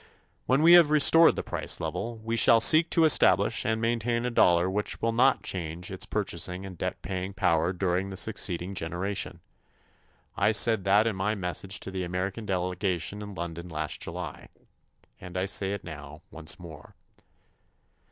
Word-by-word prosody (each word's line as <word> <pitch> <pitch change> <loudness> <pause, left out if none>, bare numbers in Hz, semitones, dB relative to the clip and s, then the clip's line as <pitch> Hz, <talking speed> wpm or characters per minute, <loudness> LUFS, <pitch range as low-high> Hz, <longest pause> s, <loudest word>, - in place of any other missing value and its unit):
When 135 +4 +2
we 170 +1 +7
have 170 -4 +7
restored 160 +2 +6
the - - -4
price - - -3
level, 115 -1 -5
we 115 +1 -2
shall 115 0 +5
seek 160 +8 +6
to 165 - +2
establish 155 - +3
and 110 0 0
maintain 115 +1 -1
a 125 - -1
dollar 90 -5 +3
which 105 +2 -3
will 115 - 0
not 130 +4 +2
change 85 +2 -5
its 95 - -5
purchasing 90 +2 -4
and 95 -1 -9
debt - - -4
paying 95 +1 -5
power 85 -1 +1
during 95 +1 -1
the 95 - -7
succeeding 95 -3 -2
generation. 90 +3 -4 0.9
I 110 - +2
said 110 -2 +3
that 100 +3 +4
in 115 -3 -1
my 100 +3 -1
message 95 0 -3
to 95 - -7
the 95 -1 -4
American 95 +5 -4
delegation 90 +1 -2
in 105 -1 -8
London 85 0 -6
last 80 -2 -4
July. - - -7 0.7
And 90 0 -8
I 90 - 0
say 100 -1 -1
it 100 0 -5
now 75 -1 -10
once 80 +1 -3
more. 80 -4 -12
95 Hz, 170 wpm, -27 LUFS, 90-110 Hz, 0.9 s, we